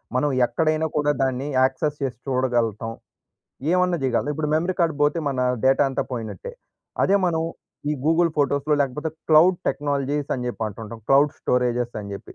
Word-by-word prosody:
మనం 145 +3 +2 0.2
ఎక్కడైనా 155 +3 0
కూడా, 150 0 +2
దాన్ని 130 +1 -1
యాక్సెస్ 135 +3 +1
చేసి 125 -4 -3
చూడగలుగుతాం. 120 -4 0 0.8
ఏమన్నా 180 -1 +2
చేయగలతాం. 130 +2 0
ఇప్పుడు 150 0 -2
మెమరీ 175 +4 0
కార్డ్ 165 -3 +2
పోతే, 145 +3 +2
మన 135 -2 -3 0.3
డేటా 135 +2 +4
అంతా 135 - -1
పోయినట్టే. 110 -6 -5 0.5
అదే 195 - +4
మనం 160 -2 0 0.5
ఈ - - +1
గూగుల్ 165 +2 +3
ఫోటోస్‌లో 145 +1 +2
లేకపోతే, 150 +4 -3 0.2
క్లౌడ్ 170 +4 +6
టెక్నాలజీస్ 145 0 -1
అని 125 -1 -4
జెప్పి 115 -2 -3
అంటుంటాం. 110 +2 -9
క్లౌడ్ 140 +2 +5
స్టోరేజెస్ 125 -1 0
అని 100 -1 -8
జెప్పి. 100 - -11
140 Hz, 155 wpm, -23 LUFS, 125-155 Hz, 0.8 s, క్లౌడ్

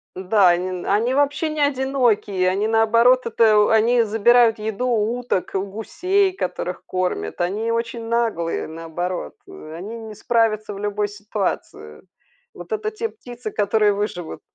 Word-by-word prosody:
Да, 190 0 +3
они 180 +1 -1
они 220 +6 +1
вообще 290 +3 +1
не 305 -1 -3
одинокие. 245 -9 +1
Они, 200 +3 0
наоборот, 230 +3 +4
это 220 -2 +3
у 210 - +4
они 230 +2 +4
забирают 225 +2 +4
еду 220 +3 -3
у 230 0 0
уток, 240 -7 -2
у 190 - 0
гусей, 365 - 0
которых 380 - -4
кормят. 180 - -3
Они 210 +6 -1
очень 230 0 -3
наглые, 225 -8 -1
наоборот. 165 - -5
Они 205 - -8
не 220 -2 -9
справятся 215 -2 0
в 200 - -8
любой 205 0 -1
ситуации. 205 - -5 0.5
Вот - - -11
это 430 0 -1
те 440 +1 -4
птицы, 245 - -9
которые 210 0 +2
выживут. 200 -5 -4
220 Hz, 145 wpm, -21 LUFS, 195-240 Hz, 0.5 s, наоборот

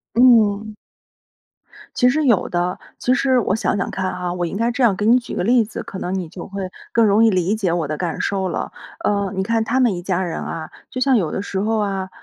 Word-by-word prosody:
嗯。 215 -4 +4 1.2
其 250 - +4
实 305 +3 +1
有 235 -7 +3
的。 175 +1 -1 0.2
其 250 - +1
实 255 0 +3
我 200 -2 0
想 215 - 0
想 190 - -2
看 190 0 -2
哈， 180 -1 -3
我 175 -1 -2
应 170 - -4
该 230 +2 +1
这 250 +1 -1
样 215 -5 +4
给 205 - -2
你 235 +3 +6
举 245 - -8
个 - - -1
例 240 +2 +4
子， 215 - -7
可 190 - -8
能 180 - -3
你 180 -3 -4
就 175 - -9
会 195 -1 -5 0.2
更 230 -1 +4
容 210 +2 +4
易 - - +6
理 185 +1 +1
解 195 -6 0
我 165 -4 -1
的 155 - -3
感 175 0 -3
受 195 -1 -1
了。 - - -3 0.3
呃， 200 -2 0
你 190 - 0
看 225 +1 +1
他 240 +4 0
们 240 -6 +3
一 175 - -5
家 185 0 -1
人 170 -3 -3
啊， 160 -1 -5 0.2
就 255 - -5
像 265 0 +4
有 170 -8 -1
的 - - -2
时 195 -1 -4
候 220 +2 0
啊， 195 -2 -2
200 Hz, 265 characters per minute, -20 LUFS, 185-230 Hz, 1.2 s, 你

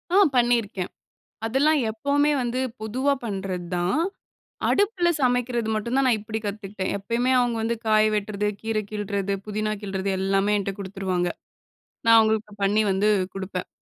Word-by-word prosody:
ஆ - - +6 0.2
பண்ணியிருக்கேன். 230 -6 +1 0.6
அதெல்லாம் 285 +6 +3
எப்பவுமே 285 +6 +1
வந்து 245 +1 -1 0.2
பொதுவா 255 +6 +1
பண்றது 190 -5 -3
தான். 175 +8 +1 0.7
அடுப்புல 395 -4 +2
சமைக்கிறது 245 -3 +1
மட்டும் 235 +4 -1
தான் 270 - +3
நான் 240 - +4
இப்டி 215 +1 -4
கத்துக்கிட்டேன். 200 -2 -4
எப்பயுமே 235 +5 0
அவுங்க 245 -2 +1
வந்து 230 +1 0
காய 215 0 +5
வெட்றது, 210 0 -1
கீரை 220 -1 -1
கிள்றது, 200 -2 -2
புதினா 215 0 -1
கிள்றது 195 -1 -2
எல்லாமே 195 +2 +1
என்ட்ட 195 0 -2
குடுத்துருவாங்க. 190 -2 -2 0.8
நான் 230 0 +8
அவங்களுக்கு 220 -1 +1
பண்ணி 205 +2 +3
வந்து 195 +2 +2 0.2
குடுப்பேன். 190 -1 -4
215 Hz, 140 wpm, -24 LUFS, 195-240 Hz, 0.8 s, நான்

